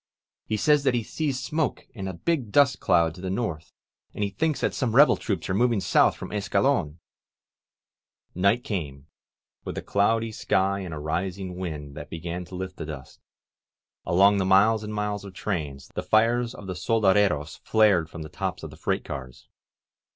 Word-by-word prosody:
He 110 - 0
says 150 +6 +3
that 130 -3 +2
he 120 - 0
sees 140 +1 -2
smoke 150 +3 -2
and 95 -5 -5
a - - -5
big 130 - -1
dust 140 0 +4
cloud 85 -2 +3
to 90 - -12
the 95 - -3
north, 95 -6 -3 0.4
and 100 -1 -2
thinks 160 -2 0
that - - 0
some 115 -4 -1
rebel 145 +3 +7
troops 95 -7 -3
are 95 - -1
moving 115 +1 +2
south - - +3
from - - -8
Escalon 105 - 0 0.7
!" - - -68 0.3
Night 100 +7 +2
came, 75 - -4 0.6
with - - -6
a - - -4
cloudy 115 +3 +1
sky 100 -2 0
and 95 -3 -6
a 80 - -5
rising 90 +5 -3
wind 75 -6 -6
that 75 - -8
began 85 +2 -5
to 90 - -10
lift 95 0 -6
the 80 - -5
dust. 70 -4 -9 0.8
Along 100 +3 +4
the - - +2
miles 105 +4 +4
and 105 - -5
miles 105 -1 -2
of 100 -2 -10
trains, 75 -10 -4
the - - -2
fires 115 +2 +2
of 105 - -10
the 95 - -4
soldaderas 95 -6 +2
flared 100 -7 +3
from 80 0 -7
the 75 - -9
tops - - -4
of - - -7
the - - -13
freight - - -1
cars. 65 -2 -8
100 Hz, 185 wpm, -26 LUFS, 85-115 Hz, 0.8 s, rebel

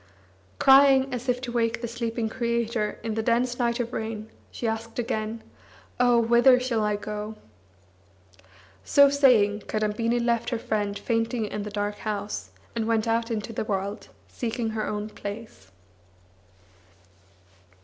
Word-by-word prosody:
Crying 270 -1 +6
as 250 +1 -4
if 250 0 +1
to 250 -2 -5
wake 230 -1 0
the 235 - -3
sleeping 230 -1 -2
Creator 235 -2 -1
in 225 -1 -2
the 220 - -1
dense 240 +2 +1
night 235 -1 +1
of 240 0 -3
rain, 220 0 -4 0.2
she 235 - -4
asked 225 +1 -4
again: 225 -1 -3 0.6
"Oh! 245 -1 +5
whither 240 +2 +5
shall 240 -3 0
I 210 0 +1
go?" 210 +1 -5 1.5
So 280 - +6
saying 235 -8 +4
Kadambini 220 +2 0
left 235 0 0
her 235 - -1
friend 205 -2 -2
fainting 225 +2 -1
in 210 0 -4
the 210 - -5
dark 205 0 -3
house, 205 -1 -4 0.3
and 225 -1 -1
went 225 -1 +1
out 230 +1 +1
into 225 0 -3
the - - -2
world, 200 +1 -3 0.2
seeking 230 -2 -3
her 215 -1 -2
own 210 0 -3
place. 205 - -8
230 Hz, 145 wpm, -26 LUFS, 215-240 Hz, 1.5 s, Crying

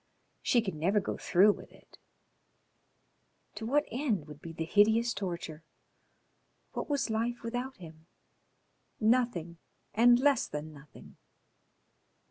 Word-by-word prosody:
She 240 -2 +3
could 190 - -3
never 180 +7 +1
go 200 - -3
through 195 +4 +4
with - - -10
it. - - -20 1.5
To 220 - -6
what 290 +4 +2
end 230 - -1
would 150 -1 -12
be 165 - -8
the 165 0 -4
hideous 220 +6 +3
torture? 170 -5 -5 1.1
What - - -4
was 280 -5 0
life 235 +2 -2
without 245 +3 -4
him? 160 -2 -13 0.9
Nothing 215 -8 +1 0.3
and 240 +2 +6
less 280 -2 +3
than 150 +1 -6
nothing. 145 0 -15
210 Hz, 120 wpm, -31 LUFS, 165-240 Hz, 1.5 s, and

